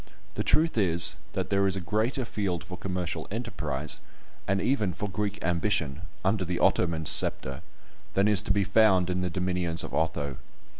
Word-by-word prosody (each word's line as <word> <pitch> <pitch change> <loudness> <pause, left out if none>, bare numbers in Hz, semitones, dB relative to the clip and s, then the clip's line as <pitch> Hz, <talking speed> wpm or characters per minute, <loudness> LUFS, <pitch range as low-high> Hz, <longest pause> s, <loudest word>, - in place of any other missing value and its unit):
The - - -2
truth 160 -6 +2
is, 85 -4 +4 0.2
that - - -3
there 100 0 +3
is 95 - 0
a - - -2
greater 110 +8 -1
field 100 -6 -2
for 90 - -8
commercial 90 -3 -4
enterprise, 100 - -3 0.5
and 95 0 +1
even 105 -6 0
for 105 - -3
Greek 105 +2 -3
ambition, 85 -3 0 0.2
under 95 0 +2
the 90 0 -2
Ottoman 80 -3 +1
sceptre, - - +4 0.5
than 100 +2 +3
is 105 -2 +4
to 105 - -1
be 100 0 +2
found 95 -3 +4
in 90 0 -1
the 90 - -1
dominions 90 -1 -1
of - - -7
Otho. 70 -4 -1
95 Hz, 170 wpm, -28 LUFS, 85-105 Hz, 0.5 s, is